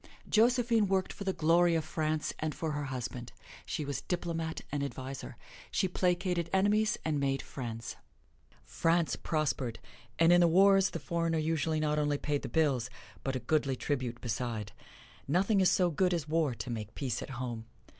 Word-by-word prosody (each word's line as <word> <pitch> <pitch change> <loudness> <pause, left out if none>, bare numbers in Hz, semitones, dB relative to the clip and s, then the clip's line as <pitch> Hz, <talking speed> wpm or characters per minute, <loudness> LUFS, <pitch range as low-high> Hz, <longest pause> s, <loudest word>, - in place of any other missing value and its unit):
Josephine 230 -1 +3
worked 190 -1 0
for 200 - -7
the 190 - +2
glory 170 0 +3
of 160 -1 0
France 155 -1 -1
and 155 -1 -2
for 160 -2 -2
her 145 -1 -2
husband: 125 -2 -5 0.4
she 150 - -2
was 140 -1 -3
diplomat 165 -2 -3
and 145 - -1
adviser. 135 -1 -6 0.3
She 190 - +1
placated 180 -1 0
enemies 210 +3 +3
and 155 -2 0
made 135 -1 0
friends. 115 -3 -6 0.7
France 165 -4 +1
prospered, 140 -7 -1 0.4
and 165 +1 +6
in 175 - +6
the 170 - +6
wars 195 +2 +5
the 165 - -5
foreigner 165 +2 -1
usually 160 0 0
not 150 0 +1
only 145 -1 +1
paid 145 0 -1
the - - -5
bills, 135 -7 +1 0.3
but 135 -1 -2
a - - -1
goodly 135 +1 +1
tribute 125 -3 -2
beside. 115 -3 -3 0.6
Nothing 195 +7 +3
is 185 - +5
so 180 -2 +3
good 180 +3 +2
as 160 -3 -3
war 155 -5 +1
to 115 +3 -5
make 110 -2 -5
peace 125 -5 -2
at - - -7
home. 120 -3 -4
155 Hz, 175 wpm, -31 LUFS, 135-175 Hz, 0.7 s, and